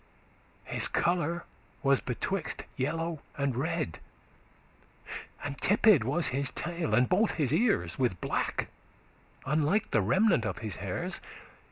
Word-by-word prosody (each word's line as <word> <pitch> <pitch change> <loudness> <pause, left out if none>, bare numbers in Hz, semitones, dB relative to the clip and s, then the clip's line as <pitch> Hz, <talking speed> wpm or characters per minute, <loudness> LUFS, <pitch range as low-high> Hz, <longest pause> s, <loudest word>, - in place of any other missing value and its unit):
His - - +2
colour 170 -1 0 0.4
was 140 -1 +4
betwixt 160 +7 -3
yellow 160 +3 -2 0.2
and 140 -3 0
red; 160 - -2 1.4
And 140 -1 -4
tipped 205 - +5
was 145 +8 +1
his 135 +1 +1
tail, 170 0 -2
and 125 0 +4
both 205 +4 +2
his 145 -4 +1
ears, 145 - +1
With 120 -9 +1
black, - - -1 0.8
unlike 155 +9 +1
the 110 - +3
remnant 180 - +3
of - - -2
his 105 - -3
hairs. - - -2
155 Hz, 125 wpm, -30 LUFS, 130-175 Hz, 1.4 s, tipped